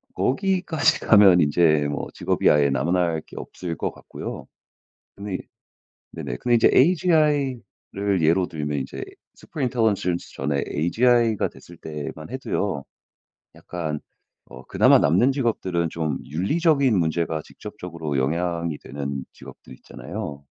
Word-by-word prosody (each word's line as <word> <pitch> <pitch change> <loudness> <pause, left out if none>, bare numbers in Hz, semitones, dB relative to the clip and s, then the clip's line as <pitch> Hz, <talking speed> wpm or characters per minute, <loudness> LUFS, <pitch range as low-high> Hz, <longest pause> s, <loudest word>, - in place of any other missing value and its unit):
거기까지 180 0 +1
가면 100 -5 +6
인제 75 0 +3
뭐 75 - -3
직업이 - - +1
아예 75 -1 +4
남아날 85 +3 0
게 - - -15
없을 85 -3 -6
것 - - -2
같고요. - - -8 0.7
근데 100 -1 -6
이 - - -9 0.7
네네. - - -5
근데 120 -1 +2
이제 115 - +5
AGI를 140 - +1
예로 85 +3 +3
들면 75 -2 -3
인제 65 - -6 0.3
super 150 - -7
intelligence 110 -8 0
전에 70 +1 -1
AGI가 115 +5 +2
됐을 85 - -15
때만 75 +1 -7
해도요 100 - -2 0.7
약간 80 -4 -5 0.5
어 65 - -12
그나마 - - +5
남는 95 - +3
직업들은 95 - -1
좀 80 -4 -2
윤리적인 135 - +2
문제가 80 -1 0
직접적으로 85 -9 -6
영향이 85 +3 -1
되는 70 -1 -5
직업들 - - -13
있잖아요. 70 -1 -8
85 Hz, 320 characters per minute, -23 LUFS, 75-120 Hz, 0.7 s, 가면